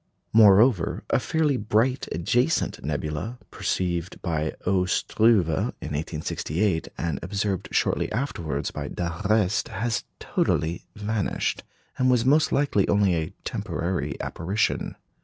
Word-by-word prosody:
Moreover, 105 -2 +5
a - - +4
fairly 155 -4 +1
bright 120 +5 +1
adjacent 120 - 0
nebula, 75 - -3
perceived 90 -1 -2
by 80 -3 -1
O. 90 -1 +2
Struve 105 0 +3
in 80 - 0 0.4
1868, 80 +4 -1
and 80 -5 -2
observed 100 +1 -2
shortly - - +1
afterwards 80 - -2
by - - -5
d'Arrest, 95 +4 0
has 115 0 -2 0.2
totally 85 +2 -1
vanished, 105 -1 -1 0.4
and 130 0 +3
was 125 -2 +3
most 150 +3 +4
likely 140 -9 +2
only 100 -2 +3
a 80 -2 -1
temporary 90 +1 -3
apparition. 95 +6 -1
100 Hz, 115 wpm, -25 LUFS, 85-115 Hz, 0.4 s, Moreover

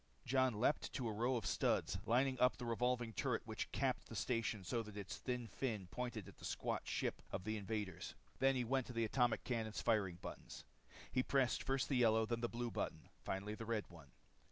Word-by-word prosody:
Jon 130 -4 +3
leaped 140 +6 +2
to 125 -4 -1
a 110 - -1
row 120 +5 +2
of 115 - -1
studs, - - +2
lining 130 +3 +3
up 125 0 +5
the 125 - -5
revolving 120 0 +1
turret - - 0
which - - -3
capped - - 0
the - - -6
station 115 -4 0
so 115 +6 0
that 105 -2 -8
its 100 -2 -4
thin 125 -2 -2
fin 110 -4 -2
pointed 115 -1 -3
at - - -12
the - - -14
squat - - -2
ship - - -1
of - - -2
the 110 +2 -1
invaders. 100 -4 -3 0.2
Then 135 0 +5
he 125 - +1
went 130 +1 +1
to 125 - -6
the 115 -1 +2
atomic 120 +1 +2
cannon's 110 -3 -1
firing 100 -6 +2
buttons. - - -8 0.5
He 130 - +3
pressed 130 -2 +2
first 135 0 +1
the 135 - +2
yellow, 110 -2 +5
then 115 +1 -1
the 120 - 0
blue 120 0 -2
button. - - -3
Finally 100 +2 -2
the 110 +1 -6
red 115 -3 0
one. 75 -6 -13
115 Hz, 210 wpm, -40 LUFS, 105-125 Hz, 0.5 s, up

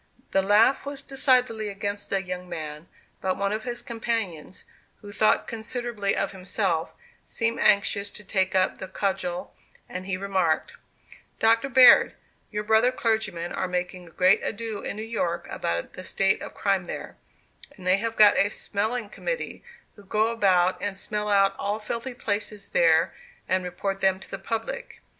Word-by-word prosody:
The 195 - +3
laugh 210 +7 +4
was 280 -1 -6
decidedly 250 -6 +1
against 200 +1 -4
the 195 -1 0
young 180 -1 -6
man; 155 -1 -6 0.3
but 185 -1 -1
one 200 0 0
of 215 +1 -3
his 240 -1 -4
companions, 225 -9 -4 0.4
who 205 - -10
thought 215 +1 +2
considerably 230 -2 -2
of - - -1
himself, 185 -3 -1 0.3
seemed 230 0 -1
anxious 200 0 +3
to 210 - -10
take 190 -1 0
up 185 0 +2
the 190 - -6
cudgel, 185 -2 -3 0.3
and 185 +1 -6
he 190 -2 -1
remarked: 185 -5 0 0.7
"Dr. 230 +4 +3
Baird, 255 -1 +7 0.4
your 210 0 -2
brother 220 +3 +4
clergymen 220 -8 -1
are - - -1
making 180 0 -3
a - - -13
great 185 +4 +4
ado 225 -1 -3
in - - -3
New 215 - -5
York 180 -7 -2
about 85 0 -3
the 185 - -8
state 195 +1 +1
of - - -8
crime 195 -3 0
there; - - -7 0.6
and 185 - -12
they 185 +1 +4
have 225 +2 -3
got 210 -1 +7
a 200 - +4
smelling 215 +3 -2
committee, - - -4 0.3
who 205 - -15
go 215 +3 +1
about 185 -5 +2
and 200 -1 -2
smell 210 0 -3
out 195 -1 +4
all 205 +2 -1
filthy 235 +4 -4
places 205 -2 -3
there, - - +3 0.3
and 185 0 +1
report 195 +2 -3
them 190 -1 +3
to - - -14
the 195 - -5
public. 225 - -4
200 Hz, 165 wpm, -26 LUFS, 185-225 Hz, 0.7 s, Baird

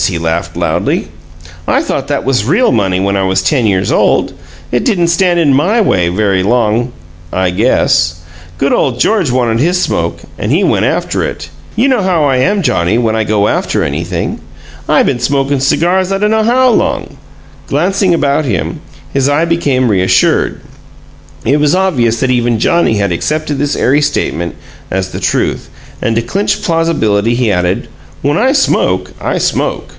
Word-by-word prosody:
he 90 - -2
laughed 80 0 -3
loudly. - - -1 0.6
"I - - +2
thought - - -3
that - - -1
was 130 -5 +1
real 200 - +2
money 95 -6 +1
when 100 +1 0
I 100 - 0
was 95 0 0
ten 125 0 +1
years 95 -1 0
old! - - +2 0.4
It 120 - 0
didn't 175 -7 +1
stand 175 0 +2
in 145 -5 +3
MY 185 - +2
way 90 - +1
very 95 0 0
long, 115 +3 +1 0.4
I 95 -1 0
guess! 90 -5 +2 0.4
Good 140 - +1
ole 130 - +1
George 175 - +1
wanted 120 -2 0
his 175 +6 +1
smoke, - - -2 0.2
and - - -2
he - - +2
went - - +1
after - - -1
it! - - -5 0.2
You 240 +5 +2
know 260 -5 +2
how 180 -5 +1
I 135 -3 +2
am, 195 +9 +1
Johnnie, 85 - +1
when 115 -2 0
I 110 - +1
go 105 -1 +1
after - - 0
anything. 85 +5 -3 0.5
I - - +4
been 125 - 0
smokin' 135 +2 0
cigars 180 +7 +1
I 195 - +1
dunno 210 +2 +1
how 250 +3 +3
long!" 145 -9 -1 0.5
Glancing 185 +6 +1
about 145 0 0
him, 105 -10 -3 0.3
his 135 0 +1
eye 150 +3 +2
became 145 -7 +1
reassured; 95 -2 +1 0.8
it 140 +5 +2
was 150 +2 +2
obvious 125 -12 +1
that 130 - +1
even 120 -2 +1
Johnnie 170 - +2
had 100 -2 0
accepted 150 - -2
this 145 0 0
airy 145 +4 +2
statement 85 - -2 0.3
as 95 0 -2
the - - -5
truth, - - -1 0.3
and 115 - 0
to 115 - 0
clinch 195 - -1
plausibility 120 - +1
he 120 -3 +1
added: 90 -1 -1 0.4
"When 145 +2 +1
I 260 +4 +3
smoke, 275 - +1
I - - -1
smoke! - - -1
130 Hz, 175 wpm, -12 LUFS, 105-170 Hz, 0.8 s, I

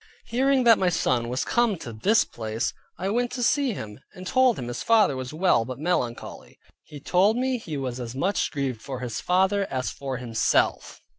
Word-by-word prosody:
Hearing 260 +3 +2
that 230 -2 +6
my 185 - +3
son 120 -8 0
was 125 +1 -2
come 235 -5 +1
to 120 -7 -8
this 205 - +3
place, 110 +1 -3 0.2
I 185 +3 -2
went 245 +3 0
to 245 -1 -2
see 275 0 +2
him, 105 - -8 0.2
and 185 - -9
told 255 +3 +3
him 120 - -5
his 120 -1 -5
father 215 -11 +4
was 130 -1 -5
well, 155 -7 +2
but 130 +2 -7
melancholy. 140 -7 -3 0.3
He 150 - -11
told 190 - +2
me 255 0 0
he 160 -9 -6
was 130 -2 -4
as 120 0 -6
much 190 +9 0
grieved 135 -6 -3
for 130 -2 -6
his 125 -3 -4
father 190 +2 +2
as 130 -1 -2
for 135 -2 -5
himself. 120 -3 0
155 Hz, 200 wpm, -25 LUFS, -, 0.3 s, that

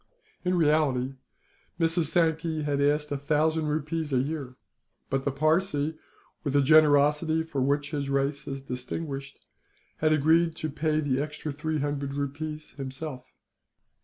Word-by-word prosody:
In 180 0 +1
reality, 145 -5 +2 0.7
Mrs. 165 0 +2
Sankey 160 -1 +1
asked 145 +1 +1
a 145 - 0
thousand 155 +2 +1
rupees 155 +1 -2
a 130 - +2
year; 135 -1 -2 0.6
but 135 0 0
the 140 - +1
Parsee, 155 +1 +1 0.5
with 140 -3 -1
the 145 - +5
generosity 150 +2 +4
for 160 -4 -3
which 145 +2 0
his 140 -3 -2
race 140 +1 0
is 135 0 -5
distinguished, 135 +2 -6 0.5
had 155 0 +2
agreed 160 +2 +3
to 155 - -4
pay 155 +1 0
the 135 -2 0
extra 150 +1 -4
three 150 +1 -2
hundred 140 -1 -2
rupees 150 +2 -4
himself. 130 0 -6
150 Hz, 135 wpm, -27 LUFS, 140-155 Hz, 0.7 s, the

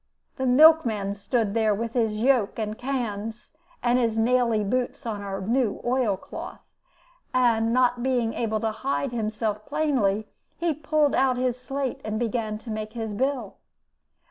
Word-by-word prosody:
The 265 -1 -1
milk 315 +5 +7
man 205 -4 -2
stood 205 +1 -1
there 220 -2 +2
with 230 +2 -4
his 225 -4 +1
yoke 245 -2 +2
and 215 -1 -3
cans, 225 -4 -4 0.3
and 245 +1 +3
his 230 -2 0
naily 230 -2 +2
boots 250 +3 -2
on 215 -3 -3
our 195 -1 -4
new 230 +1 0
oil 240 -5 +1
cloth, - - -9 0.7
and, 230 -3 +3
not 245 0 +2
being 245 -3 0
able 220 -2 -1
to 225 - 0
hide 270 +3 -2
himself 215 -2 -2
plainly, 235 -9 +1 0.3
he 335 -1 0
pulled 300 0 +1
out 260 -2 +2
his 250 -1 -1
slate 270 0 -3
and 215 0 -3
began 225 -2 -2
to 220 +1 -9
make 215 0 -4
his 225 -3 -4
bill. 255 -2 -2
235 Hz, 160 wpm, -25 LUFS, 215-255 Hz, 0.7 s, milk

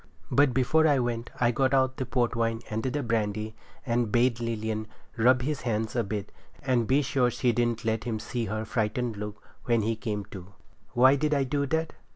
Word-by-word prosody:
But 145 -1 +4
before 145 +6 +3
I 145 -2 +4
went 120 -2 -2
I 120 -1 +3
got 130 +3 +2
out 130 -1 +2
the 130 - -3
port 120 -1 0
wine 115 0 0
and 110 +1 -1
the 135 +4 -2
brandy, 110 -2 -1 0.3
and 120 -3 0
bade 120 0 +2
Lilian 110 -2 -3 0.3
rub 125 +2 +4
his 150 +1 -2
hands 110 0 -2
a 120 - +2
bit, 100 0 -4 0.3
and 125 -4 +1
be 140 +3 +3
sure 135 -3 +2
she 120 +1 +1
didn't 120 -1 0
let 110 -1 -1
him 115 -2 -1
see 115 +1 -3
her 110 - -3
looking - - -5
frightened 105 -1 -2 0.3
when 115 -3 +2
he 115 +1 0
come 105 -3 -4
to. 95 0 -10 0.4
Why 130 +3 +6
did 150 +1 +1
I 140 - +2
do 140 +2 -1
that? 160 +2 -1
120 Hz, 200 wpm, -27 LUFS, 110-130 Hz, 0.4 s, Why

